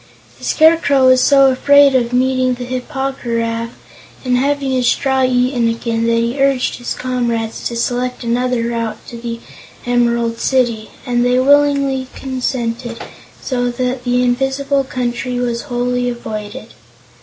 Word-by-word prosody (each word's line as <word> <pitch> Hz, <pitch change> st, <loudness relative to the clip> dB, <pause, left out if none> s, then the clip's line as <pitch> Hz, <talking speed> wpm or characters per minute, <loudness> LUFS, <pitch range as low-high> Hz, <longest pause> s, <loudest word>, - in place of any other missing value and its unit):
The -, -, -9 dB
Scarecrow 315 Hz, -4 st, +4 dB
was 255 Hz, 0 st, +5 dB
so 275 Hz, 0 st, +5 dB
afraid 285 Hz, +1 st, +5 dB
of 245 Hz, -2 st, +1 dB
meeting 255 Hz, 0 st, +1 dB
the 245 Hz, 0 st, -6 dB
Hip 255 Hz, +2 st, -5 dB
po 270 Hz, -2 st, -2 dB
gy 235 Hz, -2 st, -2 dB
raf, 230 Hz, 0 st, -2 dB, 0.6 s
and 250 Hz, -1 st, +2 dB
having 275 Hz, +1 st, 0 dB
his 255 Hz, -2 st, +1 dB
straw 265 Hz, +1 st, +1 dB
eaten 250 Hz, -1 st, +1 dB
again, 230 Hz, 0 st, -2 dB
that 230 Hz, -, +2 dB
he 235 Hz, +4 st, -1 dB
urged 275 Hz, -2 st, +1 dB
his 245 Hz, -, -4 dB
comrades 235 Hz, -3 st, -2 dB
to 235 Hz, -, -6 dB
select 245 Hz, +2 st, -2 dB
another 245 Hz, 0 st, 0 dB
route 230 Hz, -2 st, -3 dB
to 235 Hz, -, -8 dB
the 230 Hz, 0 st, -5 dB, 0.5 s
Emerald 235 Hz, -1 st, 0 dB
City, 240 Hz, -5 st, 0 dB, 0.2 s
and 245 Hz, -2 st, +1 dB
they 245 Hz, 0 st, +2 dB
willingly 280 Hz, -1 st, +2 dB
consented, 245 Hz, -3 st, -3 dB, 0.5 s
so 245 Hz, -2 st, -1 dB
that 250 Hz, +1 st, -3 dB
the 245 Hz, 0 st, +1 dB
Invisible 270 Hz, +3 st, 0 dB
Country 250 Hz, -1 st, -3 dB
was 240 Hz, -1 st, -2 dB
wholly 245 Hz, 0 st, -1 dB
avoided. 215 Hz, -2 st, -7 dB
250 Hz, 150 wpm, -16 LUFS, 235-265 Hz, 0.6 s, was